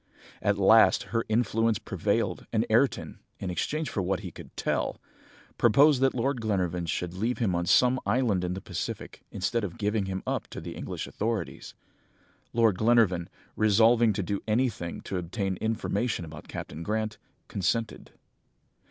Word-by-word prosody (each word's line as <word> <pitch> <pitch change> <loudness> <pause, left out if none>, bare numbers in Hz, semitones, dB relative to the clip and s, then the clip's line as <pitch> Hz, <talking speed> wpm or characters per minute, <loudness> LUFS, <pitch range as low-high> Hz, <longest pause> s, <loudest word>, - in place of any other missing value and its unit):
"At 100 0 +2
last, 105 +3 +6
her 115 0 +1
influence 115 -1 +2
prevailed, - - -1
and - - +1
Ayrton, - - +1 0.2
in 95 - -4
exchange 155 - -2
for 100 - -1
what 95 0 -1
he - - -7
could - - -13
tell, - - -1 0.6
proposed 135 +4 +5
that 135 0 +3
Lord 130 0 0
Glenarvan 90 -5 -1
should 85 +2 -2
leave 115 +7 -1
him 110 -6 +1
on 85 0 -1
some 125 +7 +4
island 105 -3 +1
in 90 0 -2
the 95 - -6
Pacific, - - -5
instead 110 +4 -1
of 100 +2 -5
giving 105 -2 0
him 95 0 -4
up - - -2
to - - -8
the - - -7
English - - -5
authorities. 110 0 -4 0.8
Lord 115 -5 +3
Glenarvan, 110 -7 +3 0.3
resolving 110 +2 +5
to 100 0 -2
do 100 +2 -2
anything 110 -6 -1
to 95 - -3
obtain 95 +2 -2
information 110 -2 -1
about 75 -1 -10
Captain 80 - -7
Grant, 110 +4 -2 0.3
consented. 110 +3 -2
105 Hz, 155 wpm, -28 LUFS, 95-115 Hz, 0.8 s, last